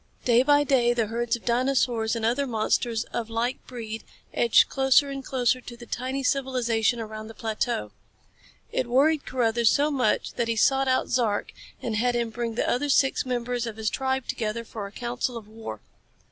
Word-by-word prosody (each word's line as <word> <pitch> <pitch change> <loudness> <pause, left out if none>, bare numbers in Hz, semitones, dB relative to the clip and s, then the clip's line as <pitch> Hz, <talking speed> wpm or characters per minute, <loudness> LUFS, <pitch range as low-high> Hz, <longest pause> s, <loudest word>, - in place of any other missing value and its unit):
Day 240 -1 +5
by 290 +2 +4
day 245 -4 +3
the 230 -2 +1
herds 230 +2 -1
of 235 - -11
dinosaurs 240 -2 +1
and 225 -1 -2
other 260 +5 +1
monsters 230 0 0
of 230 -1 -3
like 235 +3 -2
breed 225 -3 -6 0.3
edged 235 -2 +5
closer 270 +1 +3
and 275 -1 -5
closer 255 -1 +1
to 240 -1 -10
the 240 - -11
tiny 260 +4 -3
civilization 245 -4 +1
around 215 -1 -6
the 225 - -11
plateau. 220 - -2 0.8
It 250 - -1
worried 285 +5 +2
Carruthers 235 -2 +2
so 295 +2 +2
much 265 -3 0
that 235 -2 -1
he 230 - 0
sought 270 +4 +3
out 260 0 +1
Zark 230 -5 0 0.3
and 225 -2 -1
had 245 +2 +1
him 235 -1 -1
bring 230 0 -3
the - - 0
other 285 +4 0
six 270 0 +2
members 245 -1 -2
of 220 -1 -6
his 220 -1 -1
tribe 265 -1 -1
together 225 +1 -2
for 215 -2 -6
a - - -12
council 240 +1 -3
of 220 -2 -10
war. 215 - -8
240 Hz, 190 wpm, -26 LUFS, 225-260 Hz, 0.8 s, Day